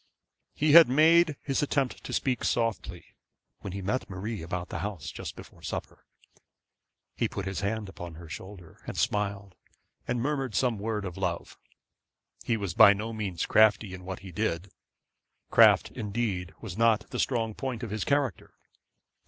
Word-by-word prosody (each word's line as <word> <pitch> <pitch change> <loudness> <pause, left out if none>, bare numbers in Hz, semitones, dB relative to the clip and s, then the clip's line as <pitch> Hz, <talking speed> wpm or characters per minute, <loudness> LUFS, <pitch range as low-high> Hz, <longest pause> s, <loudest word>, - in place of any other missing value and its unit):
He 150 0 +2
made 155 +4 +5
his 135 -2 0
attempt 140 -3 -1
to - - -6
speak 130 -3 0
softly 95 -7 -1 0.5
when 100 - -6
he 100 +1 -5
met 105 +6 -2
Marie 100 +3 -5
about 90 +2 -4
the - - -4
house 100 -8 -5
just - - -7
before - - -13
supper. - - -6 1.1
He - - 0
put 100 - -5
his 95 0 -3
hand 105 +1 -2
upon 85 -3 -8
her 85 +1 -11
shoulder, 90 0 -10
and - - -5
smiled, 100 -2 -1 0.5
and 120 0 -1
murmured 135 -3 -2
some 120 -5 +1
word 105 -1 -2
of 90 -1 -6
love. 90 -3 -3 0.8
He 115 - 0
was 100 -5 -3
by 100 - +8
no 110 +3 -5
means 100 -6 -3
crafty 110 -2 +4
in 90 0 -8
what 95 0 -6
he 95 -2 -10
did. 90 -1 -2 0.8
Craft - - +6
indeed 100 -4 -3
was 100 -6 -6
not 115 -2 +3
the - - -3
strong 115 -4 0
point 125 0 -4
of 115 - -5
his 105 -1 -2
character. 140 - -1
105 Hz, 160 wpm, -28 LUFS, 95-120 Hz, 1.1 s, by